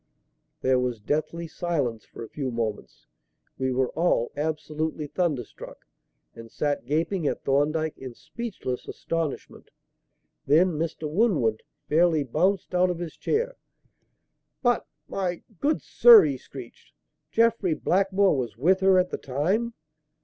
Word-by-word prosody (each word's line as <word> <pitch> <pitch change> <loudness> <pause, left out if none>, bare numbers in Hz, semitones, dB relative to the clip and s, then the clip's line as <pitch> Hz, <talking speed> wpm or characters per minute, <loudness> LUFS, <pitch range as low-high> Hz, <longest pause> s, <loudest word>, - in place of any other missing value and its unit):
There 130 -1 +3
was 125 -3 -2
deathly 155 +8 -2
silence 145 -10 -2
for - - -10
a 115 - -9
few 140 -3 -4
moments. 115 -3 -4 0.5
We 130 0 0
were 130 0 +1
all 160 -8 +1
absolutely 155 +1 -3
thunderstruck, 145 - -4 0.5
and 115 0 -11
sat 145 0 -2
gaping 160 +3 0
at - - -2
Thorndyke 155 +3 0
in 130 -2 -8
speechless 155 - -6
astonishment. 165 -3 -4 0.8
Then 165 +6 +5
Mr. 160 0 -3
Winwood 150 - +1 0.3
fairly 160 -1 +3
bounced 180 +10 0
out 180 0 +3
of 175 - -2
his 170 -2 -6
chair. 485 +3 -1 1.1
"But 245 -2 +2 0.2
my 180 -3 -3 0.2
good 300 +2 0
sir!" 465 -4 +8
he - - 0
screeched. - - -12 0.4
"Jeffrey 225 -7 +2
Blackmore 195 +1 +2
was 120 -5 -3
with 180 +9 +3
her 190 -1 +5
at 180 0 +2
the - - -3
time!" 190 - -1
160 Hz, 130 wpm, -26 LUFS, 135-185 Hz, 1.1 s, sir